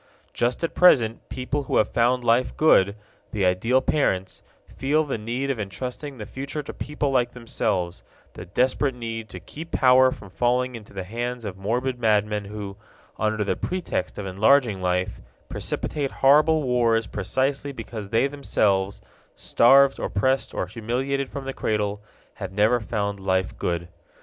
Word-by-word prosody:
Just 120 +6 -1
at 165 - -1
present 120 -11 +4
people 135 +3 -3
who - - 0
have 105 - +3
found 120 +1 +2
life 120 +2 +2
good, 100 -10 +4 0.4
the 100 -3 0
ideal 115 +9 +2
parents, 95 -11 0 0.2
feel 150 +4 0
the 135 -6 -3
need 120 +6 -2
of 125 - -4
entrusting 125 +8 -5
the 105 - -6
future 140 +6 -5
to - - -7
people 145 -1 -2
like 125 -2 +1
themselves, 100 -8 -2 0.3
the - - -8
desperate 130 +6 +1
need 115 -2 -5
to 90 - -8
keep 160 - -10
power 130 0 +5
from 100 -6 -10
falling 125 +4 +1
into 110 -4 -10
the 95 -1 -5
hands 120 +4 -4
of 100 -3 -5
morbid 120 +6 -2
madmen 105 -2 +1
who, 100 -1 -7 0.4
under 110 0 0
the 100 - -1
pretext 175 - -3
of 105 - -5
enlarging 110 +2 +3
life, 90 0 -1 0.3
precipitate 145 -3 -2
horrible 150 +4 +4
wars 120 -3 +2
precisely 135 +9 -1
because 115 -5 -7
they 115 +4 +3
themselves, 100 -9 0 0.3
starved, 135 +3 +5
oppressed, 130 +7 0
or - - -2
humiliated 130 +4 -2
from 140 -1 -6
the 135 - -4
cradle, 105 -3 -1 0.3
have 95 -3 -7
never 105 +5 +3
found 100 -2 -3
life 95 -1 0
good. 85 0 -2
120 Hz, 155 wpm, -24 LUFS, 100-135 Hz, 0.4 s, power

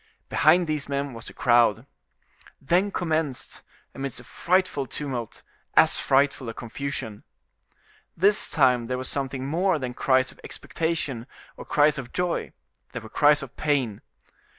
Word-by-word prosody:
Behind 170 +3 +4
these 150 -3 -3
men 140 -1 -2
was 115 0 -10
the - - -9
crowd. 120 -2 +3 0.7
Then 175 +8 +2
commenced, 160 -8 -2 0.3
amidst 135 -3 -5
a - - -12
frightful 175 0 0
tumult, 125 -5 -5 0.3
as - - +6
frightful 135 -2 +2
a 115 - -7
confusion. 120 -3 -5 0.9
This 200 +5 +2
time 125 -5 +3
there 125 +1 -2
was 130 0 -4
something 135 -1 -3
more 175 +5 +1
than 130 -3 -4
cries 130 0 +2
of - - -20
expectation 150 -7 -3 0.3
or - - -10
cries 150 0 +3
of 125 -2 -8
joy, 180 -1 -1 0.4
there 125 - -5
were 110 - -10
cries 145 +2 +4
of 135 0 -10
pain. 135 -9 0
140 Hz, 145 wpm, -25 LUFS, 125-155 Hz, 0.9 s, as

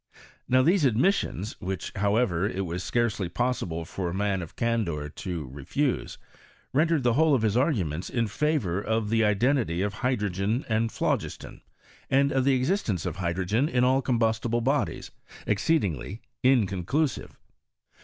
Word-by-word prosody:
Now 130 0 +5
these 175 +3 +3
admissions, 125 - +1
which, 95 -2 -4
however, 100 -2 +1
it 95 -1 -3
was 90 +1 -4
scarcely 110 -6 0
possible 90 -6 -2
for 90 +1 -4
a - - -4
man 100 -1 0
of 85 - -9
candour 100 -11 -1
to 85 -1 -5
refuse, 70 - -2 0.6
rendered 160 0 +2
the 120 -1 +3
whola 155 +2 +4
of 120 - 0
his 110 -1 +1
arguments 95 - 0
in 115 -2 0
favour 105 - 0
of 110 0 -1
the 115 0 +3
identity 105 - +1
of 100 0 -2
hydro 125 -3 0
gen 100 +8 -1
and 110 0 0
phlogiston, - - -3 0.5
and 140 +1 +3
of 130 -1 +1
the 135 -1 +4
existence 130 - 0
of - - -3
hydrt^n 95 - 0
m 125 - +4
all 130 +2 +3
combustible 115 -1 0
bodies, 120 - -1 0.3
exceedingly 100 - 0 0.2
inconclusive. 125 - +1
110 Hz, 145 wpm, -27 LUFS, 95-130 Hz, 0.6 s, Now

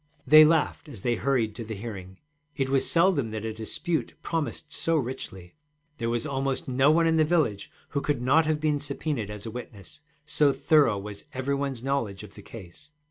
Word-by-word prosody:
They 155 +3 +9
laughed 155 -1 +1
as 115 -9 -10
they 120 - +2
hurried 120 -3 0
to 115 - -6
the 110 0 -6
hearing: 95 -3 -8 0.4
it 135 -2 -1
was 135 -1 +2
seldom 165 -8 +3
that 110 0 -5
a 110 - -3
dispute 135 +10 -3
promised 155 -1 -3
so 165 - +1
richly. 120 - -5 0.5
There 115 -1 -1
was 120 +3 -1
almost 135 -2 -2
no 135 +2 +3
one 165 +2 +4
in 165 0 +3
the 155 - +5
village 150 - 0 0.2
who 140 - -2
could 145 -2 -1
not 145 +6 +3
have 155 -1 +1
been 150 -1 +1
subpœnaed 140 -5 -3
as 105 0 -7
a 110 - -5
witness, 120 +4 -10 0.2
so 150 -1 +3
thorough 145 -10 +3
was 100 0 -8
every 130 +2 -1
one's 140 -3 -2
knowledge 115 -8 -2
of 105 - -12
the 105 - -12
case. 110 - -13
135 Hz, 195 wpm, -27 LUFS, 110-150 Hz, 0.5 s, They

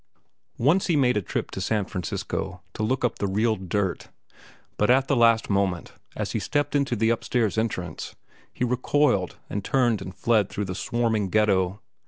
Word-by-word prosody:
Once 155 +10 +3
he 170 - +2
made 125 -4 +3
a 105 - +1
trip - - -4
to 95 - -5
San 105 +1 0
Francisco 90 0 -4
to - - -5
look 125 +4 +1
up 120 - -2
the 100 - 0
"real 110 +3 +1
dirt." 95 0 -2 0.7
But 105 - +2
at 130 +2 +4
the 140 - +2
last 115 -2 +4
moment, 95 -4 0 0.2
as - - -3
he - - -1
stepped 145 0 -1
into 140 -3 +1
the 110 +1 +2
upstairs 115 -2 0
entrance, 95 -7 -3 0.4
he 125 - -1
recoiled 125 -4 +1
and 100 - -4
turned 120 -2 +2
and 95 - -7
fled 110 -4 +2
through 105 - -3
the 95 - -4
swarming 110 -1 0
ghetto. 100 -1 +2
110 Hz, 180 wpm, -25 LUFS, 95-125 Hz, 0.7 s, at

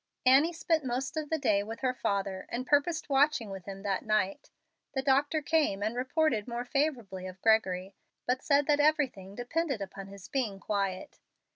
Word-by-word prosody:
Annie 275 +6 +6
spent 325 -2 0
most 260 +3 -2
of 310 -2 -3
the 320 - +1
day 205 -8 +2
with 225 +3 -7
her 255 -1 +1
father, 195 -5 -2
and 250 +2 -3
purposed 290 +4 +2
watching 275 -6 +2
with 190 -2 -8
him 195 0 -8
that 195 -2 -1
night. 215 -3 0 0.5
The 265 - 0
doctor 285 +3 +2
came 290 -11 +1
and 220 +3 -1
reported 255 -3 +1
more 240 0 -3
favorably 245 -10 -1
of 185 0 -10
Gregory, 195 -4 +2 0.3
but 255 +1 0
said 285 -1 +3
that 295 0 +3
everything 275 -11 +1
depended 275 +2 -1
upon 195 0 -7
his 195 -1 -11
being 225 -8 -2
quiet. 195 -2 -3
245 Hz, 175 wpm, -30 LUFS, 200-290 Hz, 0.5 s, Annie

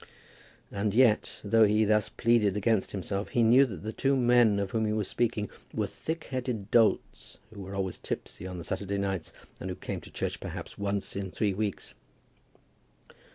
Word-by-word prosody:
And 100 0 -1
yet, 120 -4 +3
though 110 +2 +4
he 105 +1 +3
thus 105 0 +2
pleaded 110 -4 +2
against 105 -1 +1
himself, 100 +1 -3
he 120 - +2
knew 125 +5 +6
that 95 -9 -8
the 110 +1 -4
two 135 0 +1
men 120 -4 +4
of 100 -1 -2
whom 110 -1 0
he 105 - 0
was 105 -2 -1
speaking 110 -3 0 0.3
were - - +1
thick 160 +1 -5
headed 125 -6 -3
dolts 115 -2 +2 0.2
who 100 - -9
were 95 +1 -7
always 95 -2 -2
tipsy 95 - -6
on 90 -2 -6
Saturday 100 +3 -3
nights, 95 -4 -2 0.3
and - - -5
who - - -3
came - - -5
to - - -12
church - - -3
perhaps - - -7
once 100 0 -3
in 100 -1 -3
three 100 +2 0
weeks. 105 0 -3
105 Hz, 180 wpm, -29 LUFS, 100-115 Hz, 0.3 s, knew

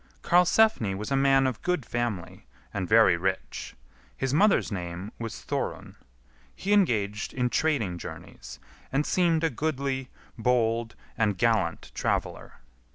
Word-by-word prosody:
Karlsefni 175 - +3
was 105 +7 -5
a - - +3
man 135 0 +4
of 130 -5 -2
good 180 -8 -1
family, 120 -7 -4 0.3
and 95 -3 -3
very 110 -6 +6
rich. 95 +2 -3 0.4
His 135 0 -1
mother's 200 - +3
name 90 +1 -5
was 115 -1 -6
Thorun. - - -4 0.6
He 200 +2 -1
engaged 105 - +1
in 125 -1 0
trading 115 - 0
journeys, - - -9 0.3
and 145 +3 +1
seemed 170 -3 +2
a 165 - +2
goodly, 135 -2 -2 0.3
bold, 115 -1 +1 0.2
and 105 -4 +1
gallant 105 -5 0
traveller. - - -3
120 Hz, 130 wpm, -27 LUFS, 100-145 Hz, 0.6 s, very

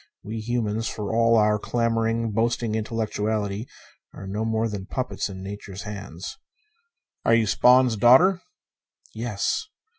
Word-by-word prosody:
We 110 +2 -5
humans, 115 -1 -1
for 105 0 -4
all 115 0 +4
our 105 0 +3
clamoring, 115 0 0
boasting 115 +1 0
intellectuality, 110 -1 -2 0.5
are 100 - -8
no 100 +3 -3
more 110 0 0
than 100 -3 -6
puppets 125 -1 -3
in 95 -1 -8
Nature's 100 -1 -7
hands. 100 - -7 0.8
"Are 115 - +4
you 115 -1 +3
Spawn's 125 +2 +4
daughter?" 135 - +6 0.7
"Yes." 110 - -2
110 Hz, 125 wpm, -24 LUFS, 105-115 Hz, 0.8 s, daughter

